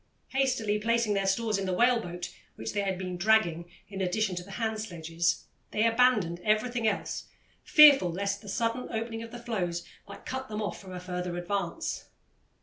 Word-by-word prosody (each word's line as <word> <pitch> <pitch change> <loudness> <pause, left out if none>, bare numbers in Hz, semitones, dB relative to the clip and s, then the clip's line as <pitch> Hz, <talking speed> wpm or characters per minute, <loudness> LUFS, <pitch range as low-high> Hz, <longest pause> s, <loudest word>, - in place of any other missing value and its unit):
Hastily 255 -6 +1
placing 230 0 +1
their 195 -1 0
stores 215 +1 +1
in 195 - -2
the 185 - 0
whale 240 +3 +4
boat, 175 -3 -6 0.2
which - - -5
they 205 - 0
had 190 -2 -1
been 180 -1 -4
dragging 175 -4 +2 0.2
in 195 -1 -6
addition 190 +1 0
to 175 - -3
the 195 +2 -11
hand 220 -1 -2
sledges, 170 -4 -1 0.2
they 215 - +1
abandoned 230 -7 +3
everything 225 +2 +1
else, 210 - -2 0.4
fearful 290 - +8
lest 200 +3 -2
the 205 - -10
sudden 230 +4 -1
opening 225 0 -3
of 230 - -7
the 240 - -8
floes 185 -8 -3 0.2
might 200 - -11
cut 260 0 -4
them 210 0 -4
off 210 - -3
from 190 -2 -11
a 180 - -5
further 180 -1 -4
advance. 175 0 -3
205 Hz, 185 wpm, -29 LUFS, 180-230 Hz, 0.4 s, fearful